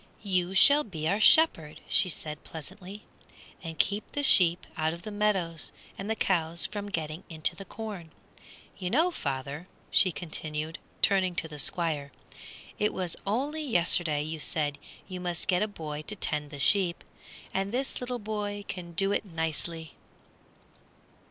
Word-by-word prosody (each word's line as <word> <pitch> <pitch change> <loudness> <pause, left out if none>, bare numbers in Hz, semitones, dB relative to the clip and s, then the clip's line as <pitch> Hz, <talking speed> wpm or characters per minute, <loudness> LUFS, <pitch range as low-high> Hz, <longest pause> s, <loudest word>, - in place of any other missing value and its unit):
"You 185 -2 0
shall 285 +8 +7
be 160 - -4
our 200 +5 +2
shepherd," 210 - +5
she 195 -3 +3
said, 150 -2 -5
pleasantly, 190 +5 -8 0.6
"and 165 -2 -6
keep 205 +1 0
the 290 - -1
sheep 175 -9 +5
out 160 0 0
of 170 - -9
the 215 - -6
meadows 190 -6 0 0.2
and 195 +2 -6
the 220 - +1
cows 170 -4 +1
from 205 +1 -4
getting 160 -1 -3
into 160 +1 0
the 195 +2 -8
corn. 205 -5 -7 0.7
You 180 -2 -2
know, 325 - +3
father," 140 - -4 0.2
she 185 - +5
continued, 155 -2 -4 0.2
turning 190 -3 +3
to 165 - -1
the 150 -2 -8
Squire, 150 -3 +1 0.7
"it 210 - +1
was 180 -3 0
only 280 +9 0
yesterday 175 - +3
you 155 +1 -4
said 145 -1 -1 0.3
you 185 -2 -6
must 175 -1 -3
get 180 -1 +3
a 215 - +2
boy 155 -7 -6
to 210 - -4
tend 150 -6 -1
the 145 - -8
sheep, 180 +3 +3 0.5
and 195 +1 -1
this 260 +3 -2
little 250 0 -3
boy 205 -2 -4
can 175 -2 -6
do 195 +4 +2
it - - +1
nicely." 165 -2 -4
180 Hz, 160 wpm, -29 LUFS, 160-205 Hz, 0.7 s, shall